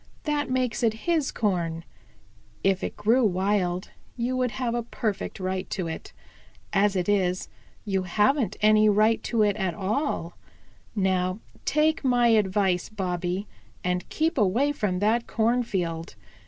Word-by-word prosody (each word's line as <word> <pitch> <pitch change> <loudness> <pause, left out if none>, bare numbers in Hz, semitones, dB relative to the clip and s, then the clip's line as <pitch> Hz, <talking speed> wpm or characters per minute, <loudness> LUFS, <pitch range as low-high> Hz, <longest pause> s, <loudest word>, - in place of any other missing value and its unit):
That 295 -3 -1
makes 255 -2 0
it 225 -1 0
his 325 -5 +1
corn. 170 -6 -1 0.8
If 190 -1 +2
it - - -4
grew 225 +5 +3
wild, 185 -2 0 0.3
you 245 +2 -1
would 255 -1 +1
have 245 -3 -2
a 240 - 0
perfect 220 -4 -3
right 185 0 -3
to 185 -4 -2
it. 160 - -6 0.6
As 200 0 +3
it 180 -2 0
is, 185 -3 +1 0.4
you 195 -2 0
haven't 210 +5 +1
any 215 0 +5
right 215 +2 +3
to 225 -3 +2
it 205 -2 +2
at 190 -4 -1
all. 200 - -2 0.6
Now 185 -2 +1 0.3
take 310 +1 +2
my 245 -2 +4
advice, 195 -4 +2
Bobby, 185 -1 -2 0.4
and 180 0 -1
keep 320 -2 0
away 230 +8 +3
from 210 -10 -1
that 225 +3 +2
cornfield. 195 - -1
210 Hz, 140 wpm, -26 LUFS, 185-240 Hz, 0.8 s, any